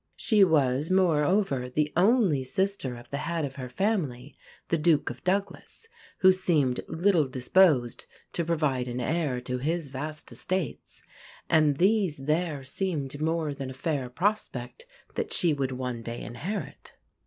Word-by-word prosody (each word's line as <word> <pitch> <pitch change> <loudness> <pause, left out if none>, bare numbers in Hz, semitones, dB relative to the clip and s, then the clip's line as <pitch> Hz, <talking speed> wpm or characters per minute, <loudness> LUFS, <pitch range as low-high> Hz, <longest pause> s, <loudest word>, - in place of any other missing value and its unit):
She 215 -4 +4
was, 145 -4 +2
moreover, 170 -6 +2
the 150 +3 -1
only 185 - +3
sister 190 -5 -1
of 120 - -14
the 140 - -2
head 170 -1 -2
of 135 -1 -8
her 130 -2 -6
family, 145 - -2 0.3
the 165 - +2
Duke 155 -4 +2
of 120 - -12
Douglas, 200 - -2 0.3
who 190 -1 +8
seemed 155 -9 +1
little 170 -3 +2
disposed 130 0 +2 0.3
to 170 - 0
provide 150 -6 0
an 125 0 -4
heir 145 -1 -1
to 125 0 -3
his 160 +2 -2
vast 150 +3 -5
estates; 185 -7 -4 0.5
and 150 -3 +4
these 190 -3 +2
there 150 +1 -1
seemed 145 -2 -3
more 160 -1 0
than 135 -2 -6
a - - -7
fair 135 -1 -2
prospect 210 - -2 0.3
that - - -3
she 170 -3 +3
would 135 -2 -2
one 125 -2 -4
day 115 +1 -6
inherit. 170 - -6
150 Hz, 150 wpm, -27 LUFS, 130-180 Hz, 0.5 s, who